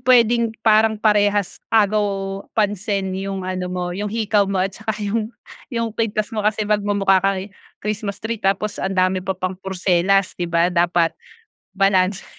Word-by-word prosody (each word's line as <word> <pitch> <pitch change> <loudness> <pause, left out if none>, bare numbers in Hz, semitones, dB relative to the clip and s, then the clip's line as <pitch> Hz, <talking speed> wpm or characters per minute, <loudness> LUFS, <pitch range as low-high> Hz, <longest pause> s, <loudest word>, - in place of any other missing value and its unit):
pwedeng 235 -2 +3
parang 220 0 +4
parehas 205 -2 +1
agaw 200 -2 +1 0.2
pansin 200 -2 0
'yong 195 0 -4
ano 185 0 -3
mo 180 -1 -3
'yong 205 +3 -3
hikaw 210 -2 +1
mo 195 - -1
at 195 - -2
saka 215 +2 -4
'yong 215 +1 -1 0.4
'yong 230 -4 -2
kuwintas 215 -1 -2
mo 220 - -1
kasi 215 +1 0
magmumukha 205 -2 +2
ka 195 +1 +1 0.5
Christmas 210 -1 -3
tree 225 0 -3
tapos 200 +2 0
ang 190 0 -2
dami 185 0 +2
mo 190 +1 -3
pang 185 0 -3
porselas 190 0 +1
'di 175 -1 -2
ba, 170 +1 +2
dapat 170 -1 +2 0.6
balanse. 195 0 +2
200 Hz, 155 wpm, -21 LUFS, 190-215 Hz, 0.6 s, parang